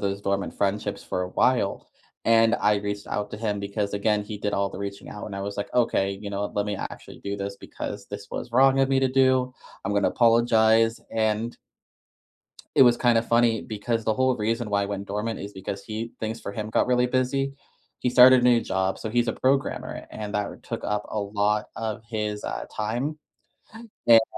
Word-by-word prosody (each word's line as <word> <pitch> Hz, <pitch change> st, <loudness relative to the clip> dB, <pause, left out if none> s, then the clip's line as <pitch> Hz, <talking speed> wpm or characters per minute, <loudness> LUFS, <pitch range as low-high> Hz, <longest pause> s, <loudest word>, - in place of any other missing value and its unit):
those 100 Hz, 0 st, -2 dB
dormant 100 Hz, 0 st, -1 dB
friendships 100 Hz, +1 st, -1 dB
for 90 Hz, -, -2 dB
a 90 Hz, -, -3 dB
while. 115 Hz, +1 st, +1 dB, 0.4 s
And 115 Hz, 0 st, +5 dB
I 105 Hz, 0 st, +3 dB
reached 100 Hz, 0 st, -4 dB
out 105 Hz, 0 st, -3 dB
to -, -, -4 dB
him 105 Hz, -2 st, -2 dB
because, 100 Hz, +1 st, -2 dB
again, 105 Hz, 0 st, +1 dB
he 105 Hz, 0 st, -6 dB
did 105 Hz, 0 st, -1 dB
all 100 Hz, 0 st, 0 dB
the -, -, -8 dB
reaching 100 Hz, 0 st, -6 dB
out, 105 Hz, -, -7 dB
and 100 Hz, -2 st, -6 dB
I 100 Hz, -, -4 dB
was 100 Hz, 0 st, -5 dB
like, 100 Hz, -, -2 dB
"Okay, 100 Hz, -5 st, +2 dB
you 100 Hz, -, -5 dB
know 100 Hz, +1 st, -2 dB
let 105 Hz, -, +1 dB
me 105 Hz, -1 st, -2 dB
actually -, -, -8 dB
do 100 Hz, 0 st, -3 dB
this 100 Hz, 0 st, -5 dB
because 100 Hz, 0 st, -7 dB
this 100 Hz, 0 st, -8 dB
was 120 Hz, -, -5 dB
wrong 135 Hz, +2 st, +5 dB
of 135 Hz, -, +3 dB
me 135 Hz, -1 st, +3 dB
to 130 Hz, -, +3 dB
do. 130 Hz, -1 st, +3 dB, 0.3 s
I'm 100 Hz, -, -1 dB
gonna 100 Hz, 0 st, +3 dB
apologize." 115 Hz, -1 st, +4 dB, 0.2 s
And 110 Hz, +1 st, 0 dB, 1.2 s
it -, -, +8 dB
was 120 Hz, -1 st, +6 dB
kinda 120 Hz, -2 st, +3 dB
funny 115 Hz, -1 st, +2 dB
because 115 Hz, +1 st, -2 dB
the 110 Hz, -, +1 dB
whole 130 Hz, +1 st, +2 dB
reason 115 Hz, +1 st, -1 dB
why 100 Hz, 0 st, +2 dB
I -, -, -1 dB
went 100 Hz, -1 st, -4 dB
dormant 105 Hz, +3 st, -3 dB
is 100 Hz, +1 st, -7 dB
because 95 Hz, +1 st, -6 dB
he 110 Hz, +1 st, -5 dB
things 110 Hz, +1 st, -3 dB
for -, -, -5 dB
him 110 Hz, +1 st, -5 dB
got -, -, +2 dB
really 125 Hz, 0 st, +3 dB
busy. 130 Hz, +2 st, 0 dB, 0.5 s
He 125 Hz, -, +1 dB
started 125 Hz, 0 st, +8 dB
new 120 Hz, -1 st, +5 dB
job. 95 Hz, -1 st, -1 dB
So, 110 Hz, -, -4 dB
he's 120 Hz, 0 st, +1 dB
a -, -, +1 dB
programmer, 135 Hz, +1 st, -1 dB
and 105 Hz, -1 st, -6 dB
that 105 Hz, -1 st, -3 dB
took -, -, -5 dB
up 105 Hz, 0 st, -1 dB
a 110 Hz, -, -2 dB
lot 105 Hz, +1 st, 0 dB
of 110 Hz, -1 st, -4 dB
his, 105 Hz, -1 st, -3 dB
uh, 60 Hz, 0 st, -4 dB
time. 120 Hz, +9 st, -2 dB, 0.9 s
And 115 Hz, -1 st, +8 dB
110 Hz, 205 wpm, -25 LUFS, 100-120 Hz, 1.2 s, it